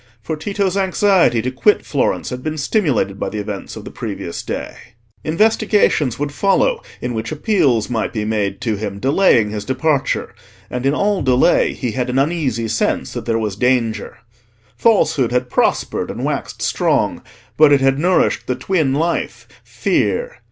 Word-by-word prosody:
For 115 +8 -4
Tito's 195 +3 -2
anxiety 190 - +2
to 130 - -1
quit 205 +11 +2
Florence 140 -1 -1
had 125 0 -5
been 155 +3 -4
stimulated 140 - 0
by - - -2
the 110 - -6
events 105 -1 -5
of - - -9
the - - -8
previous - - -5
day: - - -5 0.5
investigations 205 - +2
would 145 0 -2
follow 460 - +1 0.2
in 125 - -3
which 110 +3 -4
appeals 150 - +1
might 115 -2 -2
be 105 -2 -3
made 105 -3 -1
to 110 -3 -1
him 100 -1 -4
delaying 130 - +3
his 105 -1 -4
departure: 130 +3 -1 0.4
and 125 +2 -1
in 140 - +2
all 200 +2 +1
delay 130 +5 +3
he 125 -4 -3
had 125 +1 -2
an 125 - -1
uneasy 135 -6 0
sense 110 +1 -1
that - - -6
there 115 -1 +1
was 105 -3 -2
danger. 115 -2 0 0.6
Falsehood 155 - +2
had 125 0 -1
prospered - - 0
and - - -4
waxed - - -3
strong; - - 0 0.3
but 155 -1 +6
it 140 - +5
had 135 +1 +2
nourished 180 +3 +1
the 125 - 0
twin 155 -7 0
life, 165 +3 -2 0.2
Fear. - - -1
135 Hz, 165 wpm, -18 LUFS, 115-175 Hz, 0.6 s, but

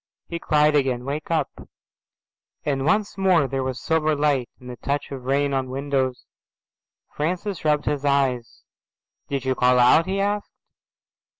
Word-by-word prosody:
He 170 - -5
cried 150 -2 +3
again, 130 -3 +1
"Wake 145 +3 -4
up," 160 -4 0 1.1
and 135 -2 -1
once 210 0 +1
more 180 -7 +3
there 135 +1 -2
was 130 -1 -3
silver 155 -1 +1
light 145 -4 +1
and 125 - -13
the 125 - -7
touch 140 +5 -3
of 130 -2 -7
rain 140 +1 +1
on 135 -1 0
the 130 - -9
windows. 135 -2 -1 0.9
Francis 180 +5 -3
rubbed 150 -1 +1
his 145 -2 -1
eyes. 135 -4 0 0.7
"Did 135 -2 -3
you 130 - +2
call 125 0 +3
out?"' 125 +7 +5
he 195 +1 -1
asked. 205 +1 -1
140 Hz, 160 wpm, -23 LUFS, 130-155 Hz, 1.1 s, out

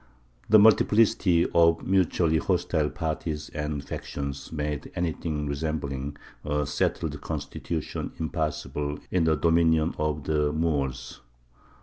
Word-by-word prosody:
The 110 - +8
multiplicity 105 -4 +4
of 85 0 +4
mutually 85 -4 +2
hostile 75 -1 0
parties 75 -1 -3
and 75 -2 -4
factions 70 -1 -6
made 75 -2 -3
anything 80 -3 -2
resembling 70 -1 -3 0.3
a 75 0 0
settled 75 - -1
constitution 80 -3 -4
impossible 75 -2 -2
in 90 -3 +2
the 80 -1 +3
dominion 80 0 +3
of 75 -1 -1
the 75 0 +1
Moors. 70 -5 -2
75 Hz, 105 wpm, -26 LUFS, 75-85 Hz, 0.3 s, The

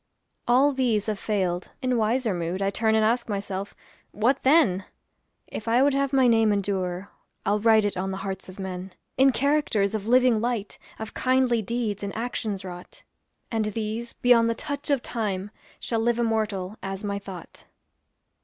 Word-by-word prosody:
All 260 +4 +5
these 245 -6 +1
have 215 -2 -2
failed. 185 -4 -1
In 255 -1 0
wiser 225 0 +1
mood 175 +1 -2
I 195 0 0
turn 220 +1 +1
and 220 0 +3
ask 235 +1 +1
myself, 200 -1 -4 0.4
"What 240 +6 +1
then?" 260 - +4 0.6
If 220 - -7
I 240 +3 +4
would 285 0 +3
have 275 0 +1
my 265 -2 +4
name 225 -2 +4
endure, 190 -2 -2 0.3
I'll 205 +2 +2
write 220 -1 +4
it 205 - -1
on 185 +1 -2
the 190 - -3
hearts 190 -1 -5
of 185 - -11
men, 185 -1 -6 0.2
In 270 +1 +5
characters 260 -8 +1
of 215 -1 -3
living 250 -2 +4
light, 230 -4 -2 0.2
Of 220 0 -7
kindly 255 -3 +2
deeds 220 -2 -2
and 200 -1 -5
actions 220 -4 -3
wrought. 180 -1 -10 0.5
And 225 -2 0
these, 220 +2 -3
beyond 235 -2 +4
the 230 - 0
touch 285 +3 -4
of 275 -4 +2
time, 205 -4 -3 0.3
Shall 230 - -1
live 235 +1 +1
immortal 215 -4 -1
as 195 +1 -5
my 200 -1 -2
thought. 190 -4 -11
220 Hz, 175 wpm, -25 LUFS, 195-240 Hz, 0.6 s, All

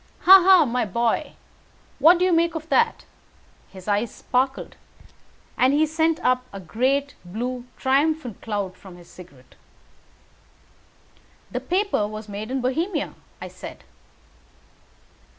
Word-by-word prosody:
Ha! 385 +1 +9
ha! 370 -4 +6
my 250 0 -1
boy, 230 +3 -1 0.7
what 330 +5 +6
do 360 - +1
you 365 - +2
make 335 0 +2
of 315 -1 -6
that?" 465 +5 +1 0.6
His 190 0 -13
eyes 210 +2 0
sparkled, 260 +4 -2 0.8
and 260 +2 +4
he 310 +1 +3
sent 320 +1 0
up 255 0 +2
a 195 - -8
great 265 - -1
blue 240 +7 -5
triumphant 275 -3 0
cloud 205 -4 -4
from 185 -3 -14
his 175 - -17
cigarette. 145 -8 -16 2.0
"The - - -2
paper 375 - 0
was 215 0 -8
made 210 +2 -6
in 265 0 -2
Bohemia," 315 +7 -2 0.3
I - - -7
said. - - -11
255 Hz, 130 wpm, -23 LUFS, 210-320 Hz, 2.0 s, Ha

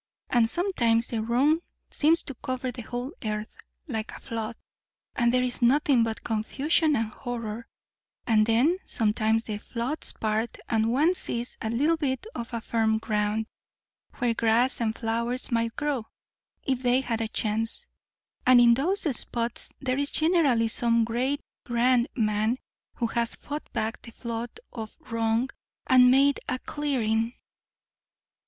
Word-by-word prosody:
And 235 -2 +4
sometimes 235 - +1
the 225 -2 -1
wrong 260 +8 +3 0.3
seems 320 +3 +3
to 275 - -5
cover 255 0 -4
the 245 - -8
whole 245 +5 -5
earth, 210 0 -3 0.3
like 220 -6 -3
a - - -9
flood, 230 0 -4 0.6
and 235 -1 +3
there 250 0 +2
is 250 0 -1
nothing 260 0 +4
but 225 -1 -3
confusion 280 +8 +1
and 225 -1 -1
horror; 230 -2 -5 0.6
and 215 -2 +3
then 265 +11 +3
sometimes 220 +1 +1
the 210 -2 -4
floods 245 +8 -2
part 220 +1 -1
and 225 0 +1
one 305 +8 +3
sees 240 -8 -3
a 220 - -2
little 290 +8 +2
bit 270 +2 -2
of 235 - -5 0.2
firm 220 -1 +1
ground, 215 0 -1 0.7
where 245 -3 +1
grass 230 +3 +2
and 220 -1 0
flowers 235 +3 -1
might 230 -1 0
grow, 285 -6 -2 0.6
if 260 -2 -1
they 250 +1 +3
had 230 -3 -2
a 225 - -1
chance. 220 +1 -1 0.6
And 250 -1 +7
in 240 -1 +7
those 350 +11 +2
spots 235 0 -2
there 260 0 0
is 285 0 +1
generally 305 -9 +3
some 235 0 +2
great, 255 +5 -1 0.2
grand 240 0 +2
man, 215 0 +1 0.4
who 240 - -1
has 235 0 -1
fought 295 +1 -7
back 220 +1 -2
the - - -11
flood 235 - -5
of 220 -2 -7
wrong 230 +2 +1 0.3
and 255 -2 +6
made 275 +2 +4
a 255 - 0
clearing." 240 -6 -1
235 Hz, 145 wpm, -27 LUFS, 225-260 Hz, 0.7 s, And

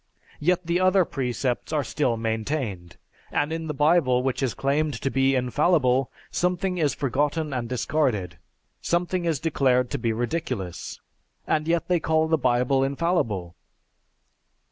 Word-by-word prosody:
Yet 180 +3 +1
the 170 +2 +1
other 185 0 +4
precepts 125 -2 -2
are 150 -2 +1
still 130 -6 0
maintained; 110 - -3 0.3
and 145 +2 0
in 165 0 -4
the 150 - -2
Bible 145 -4 +3
which 135 0 -1
is 130 -6 -1
claimed 145 -1 0
to 135 - -2
be 135 0 +2
infallible, 130 0 +2 0.2
something 180 +1 0
is 150 -3 +1
forgotten 145 +3 -1
and 120 -2 -3
discarded, 125 - -1 0.4
something 175 +1 0
is 160 -5 0
declared 130 -5 +1
to - - -2
be 115 - 0
ridiculous. 120 - -3 0.5
And 155 0 0
yet 165 -1 +1
they 180 -1 +2
call 160 0 +1
the 160 -1 +2
Bible 125 +2 +2
infallible. 135 - -1
140 Hz, 145 wpm, -25 LUFS, 125-160 Hz, 0.5 s, other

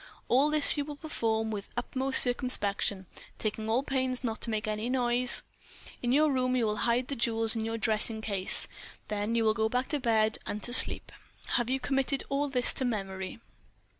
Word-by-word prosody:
All 275 +4 +3
this 300 0 +3
you 290 - -1
will 295 0 -8
perform 225 -8 -3
with 205 -2 -7
utmost 260 +2 +4
circumspection, 205 -6 -1 0.3
taking 215 0 -4
all 240 +4 0
pains 260 -2 -2
not 225 -2 -4
to - - -2
make 220 0 -3
any 215 +2 -3
noise. 245 -1 +2 0.6
In 240 - -1
your 300 +3 +3
room 255 -1 -1
you 245 -3 0
will 210 -1 -2
hide 240 +2 0
the 280 - -4
jewels 225 -1 0
in 220 -1 -3
your 225 0 -4
dressing 220 0 -1
case. 200 -4 +2 0.4
Then 210 +2 -3
you 230 - +1
will 220 -1 +2
go 220 0 -1
back 250 +2 -2
to 295 - -2
bed 220 -3 0
and 210 0 -5
to 245 - -1
sleep. - - +8 0.4
Have 240 -1 +1
you 265 +1 -1
committed 270 +1 -2
all 280 +1 -1
this 250 -2 +1
to - - -4
memory?" 195 -3 -5
235 Hz, 195 wpm, -28 LUFS, 220-260 Hz, 0.6 s, sleep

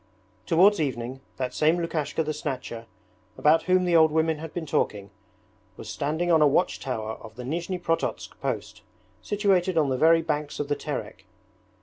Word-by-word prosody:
Towards 185 +3 +5
evening, 130 -2 -3 0.2
that 130 -1 -3
same 160 +3 +3
Lukashka 160 -2 -1
the 155 0 -2
Snatcher, 125 -6 -5 0.5
about 155 +2 +4
whom 185 0 +4
the 175 -1 +2
old 160 -1 +6
women 160 0 +1
had 160 0 -7
been 170 -2 -4
talking, 100 -8 -1 0.7
was - - -9
standing 160 +5 -1
on 160 -2 +5
a 150 - +7
watch 145 +6 +1
tower 110 -4 -4
of 110 -1 -12
the 125 - -7
Nizhni 170 +7 -3
Prototsk 165 -2 -2
post - - -4 0.4
situated 190 -4 +1
on 150 -3 +3
the 130 - 0
very 165 +1 +5
banks 150 -2 -3
of 145 -1 -3
the 145 - +1
Terek. - - -6
155 Hz, 175 wpm, -26 LUFS, 135-170 Hz, 0.7 s, a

